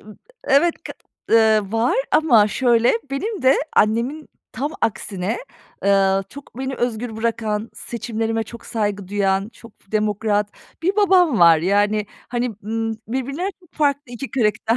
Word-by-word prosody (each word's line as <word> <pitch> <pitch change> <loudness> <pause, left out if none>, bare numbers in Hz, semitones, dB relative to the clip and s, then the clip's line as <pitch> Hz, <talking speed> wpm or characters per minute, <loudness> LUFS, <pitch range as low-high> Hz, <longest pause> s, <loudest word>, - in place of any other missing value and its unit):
ımm, 215 0 -15 0.3
evet, 305 +5 +3
kı - - -6 0.4
ııı, 220 -3 +4
var 235 - +1
ama 235 -10 +5
şöyle, 235 +1 +3 0.2
benim 400 +9 -3
de 260 +1 +5 0.2
annemin 240 +8 +1 0.2
tam 275 +6 -3
aksine, 200 -1 -2 0.5
eee, 195 -1 +3
çok 280 -3 -12
beni 265 0 -3
özgür 240 -2 -3
bırakan, 225 -1 -2
seçimlerime 225 -1 -3
çok 235 +1 -11
saygı 205 -4 -2
duyan, 195 0 0
çok 230 -1 -15 0.2
demokrat 210 -1 0 0.3
bir 380 +4 +1
babam 365 - +4
var. 170 -2 +7
Yani, 205 +4 +1 0.2
hani, 240 -3 -2
ımm, 225 +1 -2
birbirlerine 275 - -2 0.2
farklı 285 -4 0
2 240 0 -6
karakter 225 -1 +1
225 Hz, 135 wpm, -21 LUFS, 210-260 Hz, 0.5 s, var